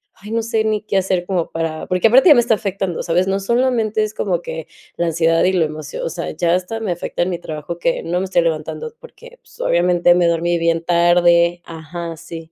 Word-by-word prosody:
ay, 210 +3 -11
no 230 - 0
sé 225 -1 0
ni 215 -1 0
qué 205 -2 -2
hacer 185 -2 0
como 180 -4 -1
para 165 -1 -3
porque 185 +3 +3
aparte 260 +9 +6
ya - - +10
me 240 - +5
está 230 -2 +2
afectando, 195 -4 -3
¿sabes? 180 +2 +1
No 195 +1 0
solamente 230 0 +1
es 215 0 -4
como 175 -4 -1
que 160 -2 -6 0.3
la 170 - 0
ansiedad 165 0 +2
y 185 - +2
la 175 -3 +2
emocio 155 -1 -6
o - - -2
sea, - - -5
ya 170 +2 +1
hasta 185 +5 -3
me 215 -4 -2
afecta 175 0 -4
en 180 - -2
mi 175 - -2
trabajo 155 +1 -6
que 170 - 0
no 175 +2 -2
me 190 - -2
estoy 185 -2 +2
levantando 165 - -3
porque, - - -15
pues, - - -21
obviamente, 175 - +3
me 175 -1 +3
dormí 170 +1 +1
bien 165 0 0
tarde 175 0 +3
ajá, 165 +1 -7
sí. 165 +1 -10
175 Hz, 230 wpm, -19 LUFS, 165-205 Hz, 0.3 s, ya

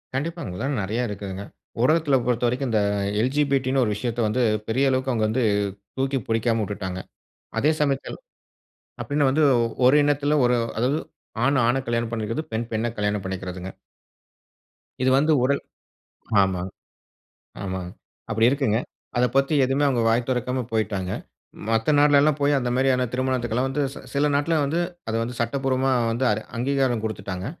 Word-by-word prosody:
கண்டிப்பாங்க. 165 - -3
அங்கல்லாம் 130 +10 -2
நெறைய 105 +5 -2
இருக்குதுங்க. 100 -2 -6 0.4
உலகத்துல 155 0 +3
பொறுத்தவரைக்கும் 125 +2 0
இந்த 110 - +3 0.4
எல். 125 +3 +1
ஜி. 150 - +3
பி. 140 - +5
டி. 130 - -2
ன்னு 135 - +3
ஒரு 110 - 0
விஷயத்தை 120 +2 -2
வந்து 110 +4 0 0.3
பெரிய 135 +4 +2
அளவுக்கு 130 0 0
அவங்க 110 -3 +1
வந்து 120 +3 0 0.5
தூக்கி 135 +1 0
புடிக்காம 115 0 +1
வுட்டுட்டாங்க. 95 -3 -4 0.6
அதே 150 - +3
சமயத்தில் 140 -2 -1 0.8
அப்படின்னா 145 -1 +1
வந்து 155 +3 +2 0.4
ஓர் 130 +4 +6
இனத்தில 145 +1 +2
ஒரு 120 0 +3 0.2
அதாவது 130 +7 +1 0.5
ஆண் 140 0 +3
ஆண 120 +2 +2
கல்யாணம் 115 -1 -1
பண்ணிக்கிறது, 115 +5 -2
பெண் 115 +1 -1
பெண்ணை 115 +1 0
கல்யாணம் 105 -1 -1
பண்ணிக்கிறதுங்க. 95 -1 -5 1.3
இது 130 - +3
வந்து 155 +3 +3
உடல் 140 +2 +1 0.8
ஆமாங்க. 95 -1 -1 0.9
ஆமாங்க. 95 -2 -4 0.4
அப்படி 110 +1 +3
இருக்குங்க. 135 -6 +1 0.4
அதை 125 - +4
பத்தி 135 +3 +3
எதுவுமே 135 +3 +1
அவங்க 125 -4 +1
வாய் 115 +2 +1
தொறக்காம 125 0 -1
போய்ட்டாங்க. 100 -4 -1 0.6
மத்த 115 +4 +2
நாடுலல்லாம் 145 0 +5
போய் 145 0 +3
அந்த 125 -2 -2
மாரியான 130 -1 +2
திருமணத்துக்கல்லாம் 125 -1 0
வந்து 145 +2 -1
சி - - -9
சில 145 +1 +2
நாட்ல 145 +4 +1
வந்து 155 +5 0 0.3
அதை 110 - -1
வந்து 120 +1 -5
சட்டபூர்வமா 130 +2 0 0.2
வந்து 120 +3 -1
அரு 105 +1 0 0.2
அங்கீகாரம் 130 -2 +1
குடுத்துட்டாங்க. 95 -3 -4
125 Hz, 150 wpm, -24 LUFS, 110-135 Hz, 1.3 s, ஓர்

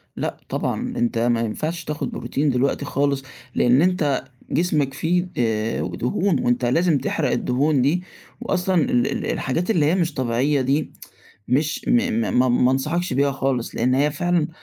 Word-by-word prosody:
لأ - - -3
طبعًا 245 0 -2
أنت 240 - 0
ما 115 0 +2
ينفعش 155 +10 -3
تاخد 150 -1 -4
بروتين 145 +1 -1
دلوقتي 130 +2 0
خالص، 140 -1 0 0.3
لأن 125 +4 +4
أنت 165 -8 +1 0.3
جسمك 150 -6 +1
فيه، 175 +4 0
آآ 110 -6 0
دهون 165 - 0
وأنت 120 +1 +1
لازم 160 +5 +2
تحرق - - -1
الدهون 140 +2 +1
دي 165 +7 +1 0.4
وأصلًا 185 +1 0
ال 120 -3 +1
ال - - -3
الحاجات 165 - -1
اللي 160 -8 +2
هي 160 - +3
مش 170 -4 0
طبيعيّة 130 +3 +1
دي 140 +4 0 0.6
مش 145 +5 0
م - - +3 0.3
م - - -1
ما 130 0 +4
ما 125 +1 +3
أنصحكش 155 +5 -1
بيها 140 +2 +2
خالص 135 -3 -2
لأن 130 +1 +1
هي 145 +3 +2
فعلًا 175 +1 0
145 Hz, 165 wpm, -22 LUFS, 125-170 Hz, 0.6 s, لأن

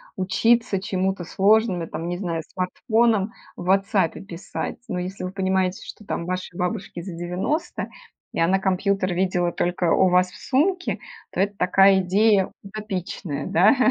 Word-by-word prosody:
учиться 220 +2 +2
чему-то 190 -3 -1
сложным 200 -2 +3
и, - - -6
там, 165 - -5
не 175 0 -2
знаю, 170 -4 -2
смартфоном 220 +3 +1 0.3
в 175 - -7
"Вотсапе" 195 -2 +2
писать. 180 -2 -6
Но 180 - -2
если 185 +1 -5
вы 185 - -4
понимаете, 190 0 0
что, 210 - -11
там, 170 - -3
вашей 185 -1 -4
бабушке 180 0 -3
за 185 -3 -6
90, 180 - -2 0.4
и - - -3
она 185 +3 +3
компьютер 190 -1 0
видела 180 -1 +1
только 175 -1 0
у 190 - +5
вас 180 0 +3
в 210 - -13
сумке, 355 +7 +1 0.3
то - - 0
это 200 0 0
такая 195 +1 +5
идея 195 +1 +3
утопичная, 195 -6 -5
да. 195 +10 +5
190 Hz, 155 wpm, -23 LUFS, 180-205 Hz, 0.4 s, у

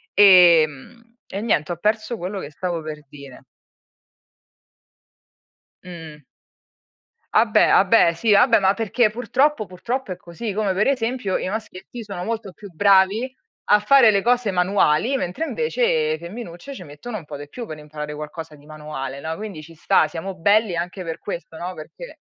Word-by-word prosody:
ehm, 185 - +5
e 200 - -5
niente, 175 -8 0
ho 175 - -4
perso 215 +5 -1
quello 195 +2 -5
che 145 - -7
stavo 170 +2 -4
per 150 -1 -8
dire. 140 -2 -13 2.4
Uhm 160 -4 -10 1.1
Vabbè, - - +4
vabbè, 170 - +5
sì, 210 +6 0
vabbè, 230 +3 +5
ma 195 0 +2
perché, 225 +1 +1
purtroppo 245 +3 0
purtroppo, 230 +6 -5
è 180 - -5
così, 180 +5 -6
come, 205 -2 0
per 200 +3 +1
esempio, 245 -6 -1
i - - -4
maschietti 215 +2 -7
sono 195 -4 -6
molto 220 -1 -4
più 205 +2 -12
bravi 200 +7 +3 0.4
a 210 - +7
fare 235 +2 +6
le 200 -1 +1
cose 240 -1 +1
manuali, 185 - +2
mentre, 180 - -3
invece, 470 +2 0
femminucce 205 +5 -9
ci 190 - -9
mettono 175 +10 -8
un 170 - -10
po' 150 - -8
di 145 +1 -9
più 240 +9 -7
per 155 -6 -8
imparare 150 0 -7
qualcosa 150 +1 -8
di 145 0 -19
manuale, 150 -3 -7
no, 160 +3 -4
quindi, 200 -5 -8
ci 165 +2 -14
sta, 155 0 +2
siamo 175 +5 -6
belli 205 +2 +2
anche 180 +3 -4
per 165 -2 -5
questo, 170 -4 -7
no, 180 +2 -5
perché 180 - -11
190 Hz, 160 wpm, -22 LUFS, 160-225 Hz, 2.4 s, a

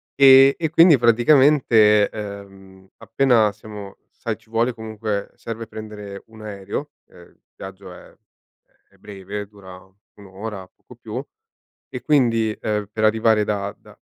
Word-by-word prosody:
E 135 0 +7
e 160 -2 -2
quindi 165 -2 +6
praticamente, 120 -3 +4
ehm, 100 -2 -10
appena 115 -1 +2
siamo 105 -1 -11
sai - - -5
ci - - -29
vuole 115 +2 0
comunque 110 -2 -5
serve 115 -1 -7
prendere 105 -2 -9
un 110 -1 -15
aereo, 105 +7 -6 0.2
ehm, 85 - -17
il - - -33
viaggio 95 -1 -11
è - - -16 0.8
è - - -26
breve, 100 0 -8
dura 95 -3 -14 0.4
1 100 - -15
ora 95 0 -8
poco - - -19
più; - - -7 0.7
e 125 - -7
quindi, 115 -6 +1
ehm, 105 -1 -3
per 110 0 -4
arrivare 110 0 +2
da 100 -1 -3
da - - -19
110 Hz, 140 wpm, -21 LUFS, 100-115 Hz, 0.8 s, E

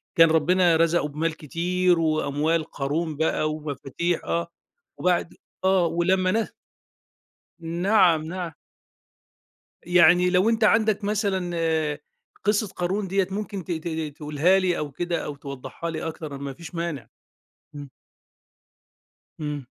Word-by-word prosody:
كان 165 -1 +7
ربنا 175 +2 +4
رَزَقه 165 -2 +2
بمال 155 +2 -2
كتير 175 +3 +1
وأموال 155 0 +1
قارون 155 +2 -3
بقى 155 -1 +1
ومفاتيح 155 +3 -3
آه، 170 0 -1 0.5
وبَعد 180 -2 0 0.3
آه 190 -2 +4
ولمّا 185 +3 +1
نه 225 0 0 1.1
نَعَم 170 -1 +3
نَعَم. 175 -1 -4 1.3
يعني 175 +1 +5
لو 185 +4 +3
أنت 225 -1 +1
عَندك 215 -1 +3
مثلًا، 195 -4 -1 0.9
قِصّة 210 +1 +2
قارون 190 +3 -2
دِيَّة 195 0 +1
ممكن 200 -2 -4
ت 180 - -6
ت 160 0 -3
ت 160 -3 -4
تقولها 150 +6 +2
لي 180 -2 +1
أو 150 -1 -4
كده، 175 +4 -2
أو 145 - -5
توضّحها 140 +4 -7
لي 160 -1 -4
أكتر 155 -3 -6
ما 140 0 -5
فيش 170 +5 -11
مانع. 165 -9 -4 0.7
إمم. 145 -2 -8 1.5
إمم. 150 -3 -4
170 Hz, 125 wpm, -25 LUFS, 155-185 Hz, 1.5 s, كان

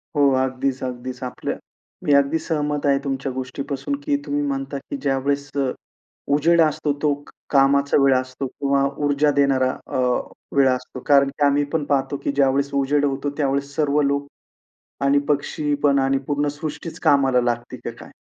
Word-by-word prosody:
हो, 145 -1 +5
अगदीच, 130 0 -2
अगदीच. 125 0 -5
आपल्या 125 - -4 0.5
मी 145 - +3
अगदी 140 +3 +3
सहमत 150 -2 -2
आहे 140 -1 +4
तुमच्या 135 -1 -2
गोष्टीपासून 135 +2 -4
की 145 - +1
तुम्ही 145 -1 -1
म्हणता 140 0 -2
की 280 - -6
ज्यावेळेस 140 +1 0
अ, 135 -2 +1 0.6
उजेड 165 +3 +4
असतो 155 -1 +1
तो 150 -1 +3
क - - -14 0.2
कामाचा 140 0 +4
वेळ 135 -1 +5
असतो 130 +1 -4
किंवा 140 +1 0 0.2
ऊर्जा 145 +1 +3
देणारा 135 -2 +2 0.2
अ, - - -3 0.6
वेळ 135 -1 +6
असतो. 125 0 -3
कारण 140 -1 +5
की 145 +1 0
आम्ही 145 +1 +3
पण 160 -2 +1
पाहतो 140 -1 0
की - - 0
ज्यावेळेस 140 0 +1
उजेड 140 +1 +2
होतो 140 0 -1
त्यावेळेस 140 0 -1
सर्व 150 -1 +2
लोक 140 0 0 0.8
आणि 140 +1 +4
पक्षी 145 0 0
पण 140 -1 +4
आणि 135 0 +2
पूर्ण 145 0 0
सृष्टीच 150 +3 -6
कामाला 135 -3 +4
लागते 120 0 -2
की - - -6
काय? - - -13
140 Hz, 170 wpm, -22 LUFS, 135-145 Hz, 0.8 s, वेळ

